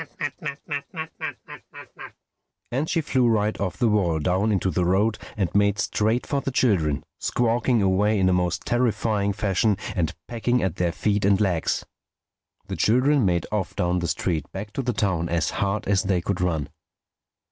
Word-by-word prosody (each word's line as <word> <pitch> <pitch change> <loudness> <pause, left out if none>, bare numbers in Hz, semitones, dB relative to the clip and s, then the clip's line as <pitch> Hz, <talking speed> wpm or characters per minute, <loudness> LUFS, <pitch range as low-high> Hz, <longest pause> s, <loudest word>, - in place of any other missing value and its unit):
And 135 +6 -1
she 165 - +1
flew 130 -5 +2
right 110 -2 +1
off 90 -3 -2
the 120 - +2
wall 95 -7 +2
down 95 +7 +1
into 95 -2 +1
the 90 +2 0
road 100 +5 +2 0.2
and 95 -5 -1
made 100 0 +3
straight 110 +3 0
for 140 -1 -1
the - - -2
children, 95 - +1 0.2
squawking 120 -1 +1
away 100 +3 +2
in 95 -1 +3
a 95 - +3
most 90 -1 0
terrifying 110 -4 +1
fashion 105 0 +1 0.2
and 85 -4 -1
pecking 120 +1 0
at 95 -2 -1
their 90 -1 +1
feet 100 +6 0
and 100 0 +4
legs. 90 -6 0 0.8
The - - -5
children 130 +1 +3
made 85 -2 +1
off 105 -4 -2
down 90 +1 +1
the 85 - -2
street 80 -5 -2
back 105 +2 -7
to - - -1
the 125 -1 -1
town 90 -6 0
as 85 -2 0
hard 100 +1 -1
as 100 -1 +3
they 95 -2 +1
could 90 +1 -2
run. 80 -5 -1
100 Hz, 165 wpm, -24 LUFS, 90-110 Hz, 0.8 s, and